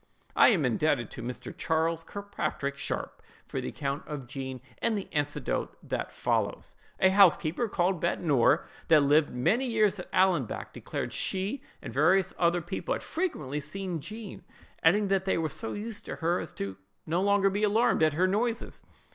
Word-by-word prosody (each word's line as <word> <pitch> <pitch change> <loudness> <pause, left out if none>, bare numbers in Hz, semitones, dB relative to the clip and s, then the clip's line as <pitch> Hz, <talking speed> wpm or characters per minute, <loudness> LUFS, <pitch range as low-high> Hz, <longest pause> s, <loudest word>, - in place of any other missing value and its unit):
I - - +7
am 180 - +2
indebted 125 +1 +1
to - - -7
Mr. 125 +1 -6
Charles 165 0 0
Kirkpatrick 155 -8 -4
Sharpe 140 - -4 0.2
for - - -4
the - - -4
account 140 0 -3
of 145 -4 -5
Jean, 130 0 -6 0.2
and 230 -2 +1
the 195 - -5
anecdote 145 -1 -2
that - - -3
follows. - - -1 0.3
A 190 - +6
housekeeper, 190 +2 +4
called 180 -2 0
Bettie 170 - 0
Norrie, 145 -1 +3 0.2
that 155 -3 +6
lived 145 +2 +4
many 220 - +1
years 215 -4 +2
at 180 - -8
Allanbank, 185 - +1
declared - - -5
she 195 +8 0 0.2
and - - -7
various 180 +7 +3
other 170 0 +2
people - - -2
had - - -7
frequently 150 - -2
seen 175 +3 -4
Jean, 215 +4 -7 0.4
adding 200 +5 +4
that 195 -1 +1
they 190 - +1
were 160 -1 0
so 225 +10 -4
used 215 +1 -5
to - - -5
her, 170 +2 0
as 160 - -6
to 100 -1 -4
be 95 - -24 0.3
no 170 +3 0
longer 200 0 +3
alarmed 225 +2 +3
at 155 -2 +4
her 180 +3 +3
noises. 225 +5 -1
175 Hz, 175 wpm, -29 LUFS, 150-200 Hz, 0.4 s, I